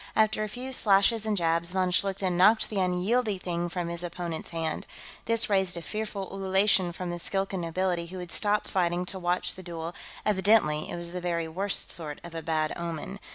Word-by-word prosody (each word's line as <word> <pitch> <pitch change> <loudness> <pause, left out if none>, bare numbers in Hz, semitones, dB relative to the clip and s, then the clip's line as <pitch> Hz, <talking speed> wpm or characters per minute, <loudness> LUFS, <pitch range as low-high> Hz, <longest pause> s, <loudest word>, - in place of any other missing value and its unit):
After 215 0 +3
a - - -2
few 255 +4 -5
slashes 215 0 +4
and 210 -1 +1
jabs, 170 0 +1
von 185 -1 +1
Schlichten 190 -1 +1
knocked 210 +6 +5
the 205 - -1
unwieldy 195 +4 +1
thing 175 -1 -3
from 175 0 -3
his 170 0 -4
opponent's 170 -1 -4
hand. 165 -2 -3 0.4
This 230 0 +3
raised 190 -4 +1
a 170 - -6
fearful 210 -2 -4
ululation 195 -1 +3
from 180 0 -5
the 175 - -4
Skilkan 195 +1 -1
nobility, 175 0 -1
who 185 +2 -8
had 180 -2 -6
stopped 210 +3 +2
fighting 175 -1 0
to 190 +1 -7
watch 180 0 0
the 185 - -10
duel; 170 -1 -5 0.3
evidently 190 -7 +3
it - - -4
was 170 0 -5
the 180 0 -4
very 170 -2 -1
worst 190 +5 0
sort 155 -3 -5
of 170 -1 -9
a 165 - -4
bad 155 -1 0
omen. 170 +3 -5
180 Hz, 200 wpm, -28 LUFS, 170-200 Hz, 0.4 s, knocked